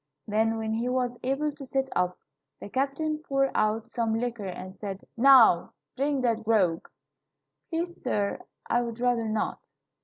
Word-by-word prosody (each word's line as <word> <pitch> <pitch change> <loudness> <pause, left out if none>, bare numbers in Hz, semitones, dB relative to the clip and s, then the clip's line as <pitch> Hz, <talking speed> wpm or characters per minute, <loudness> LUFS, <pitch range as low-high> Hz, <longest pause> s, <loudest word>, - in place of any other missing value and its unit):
Then, 220 +2 +1
when 220 0 -2
he 235 +3 -1
was 250 -1 0
able 275 +4 0
to 285 -1 -11
sit 270 0 -1
up, 180 0 +1 0.4
the - - -8
captain 280 +5 -1
poured 275 -3 0
out 215 +1 +1
some 230 -2 -1
liquor 235 -4 -3
and 185 +1 -7
said: 195 -2 -6
"Now, 240 -8 +6 0.2
drink 280 0 0
that 230 -2 +1
grog." 195 -7 +2 0.8
"Please, 345 +1 -3
sir, 205 -5 -1 0.3
I 240 - +2
would 235 -1 -5
rather 240 -2 +1
not. 215 0 -1
235 Hz, 155 wpm, -27 LUFS, 215-270 Hz, 0.8 s, Now